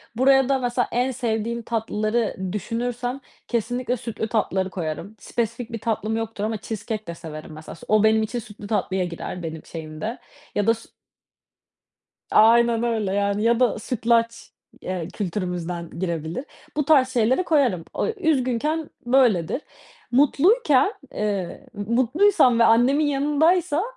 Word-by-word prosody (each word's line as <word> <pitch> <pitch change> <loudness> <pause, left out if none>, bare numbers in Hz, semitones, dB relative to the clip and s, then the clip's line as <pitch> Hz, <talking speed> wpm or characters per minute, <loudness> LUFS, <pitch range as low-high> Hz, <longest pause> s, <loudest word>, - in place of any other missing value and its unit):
Buraya 270 +1 +4
da 270 -1 +2
mesela 245 0 0
en 250 +2 +1
sevdiğim 235 -2 -2
tatlıları 220 0 -1 0.2
düşünürsem 245 +5 -3 0.3
kesinlikle 245 +2 -1
sütlü 225 -1 -4
tatlıları 190 -4 0
koyarım. 175 +4 -5
Spesifik 235 0 -3
bir 230 - -4
tatlım 220 0 -1
yoktur 225 -2 -4
ama 220 0 -1
cheesecake 215 0 -5
de 170 - -5
severim 155 -1 -9
mesela 155 +1 -9
s - - -14
o 215 0 +4
benim 220 0 +4
için 240 +3 -3
sütlü 210 -1 -10
tatlıya 190 -3 0
girer 175 +1 -6
benim 160 -1 -6
şeyimde 165 +9 -6 0.4
ya 205 +1 +1
da 230 - +6
s 230 - -12 1.4
Aynen 235 +1 +5
öyle, 220 -5 0
yani, 200 +1 0
ya 235 +1 +3
da 245 -4 +2
sütlaç, 230 0 0 0.3
eee, 180 -3 -4
kültürümüzden 180 -3 -3
girebilir. 170 - -3 0.3
Bu 295 - +1
tarz 270 -4 +5
şeyleri 255 +7 +2
koyarım. 260 - +2
O - - -1
Üzgünken 310 - 0 0.2
böyledir. 240 - +3 0.5
Mutluyken, 295 - +4 0.2
eee, 200 -4 -3
mutluysam 250 - +3
ve - - +6
annemin 250 +7 +4
yanındaysam 300 +4 +2
230 Hz, 135 wpm, -23 LUFS, 205-255 Hz, 1.4 s, da